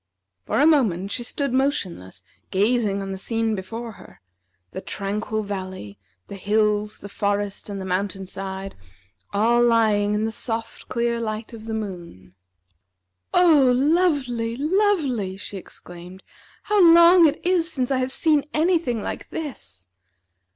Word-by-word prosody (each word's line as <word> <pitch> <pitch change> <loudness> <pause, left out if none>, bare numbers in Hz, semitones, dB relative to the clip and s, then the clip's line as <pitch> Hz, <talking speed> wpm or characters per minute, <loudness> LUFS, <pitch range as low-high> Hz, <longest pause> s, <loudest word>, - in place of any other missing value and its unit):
For - - 0
a 290 - +5
moment 210 - +2
she 240 - -2
stood 275 +2 -3
motionless, 185 - -2 0.3
gazing 205 0 +1
on 195 - -5
the 190 - -4
scene 225 +1 -1
before 225 +4 -6
her, - - -16 0.5
the - - -6
tranquil 210 +3 -3
valley, 185 - -6 0.3
the 200 - -8
hills, 210 +1 0
the - - -10
forest, 205 0 -2
and 200 -1 -5
the 190 - -5
mountain 190 +1 -2
side, 195 +1 -6 0.6
all 230 +4 +3
lying 215 -3 +3
in 215 +1 0
the 225 - -2
soft 225 0 -4
clear 235 -1 0
light 220 0 -4
of 220 -1 -10
the 225 -1 -3
moon. 175 - -7 1.0
"Oh, 310 -8 +5
lovely! 270 -6 +1
lovely!" 290 - 0
she 200 0 -7
exclaimed. 180 0 -11 0.4
"How 415 -2 +3
long 340 0 +8
it 300 +1 -1
is 350 -2 +2
since 260 -4 -1
I 265 - +2
have 255 0 -1
seen 300 0 +2
any 335 +3 +3
thing 240 -9 -3
like - - -6
this!" 95 - -6
220 Hz, 145 wpm, -23 LUFS, 195-270 Hz, 1.0 s, long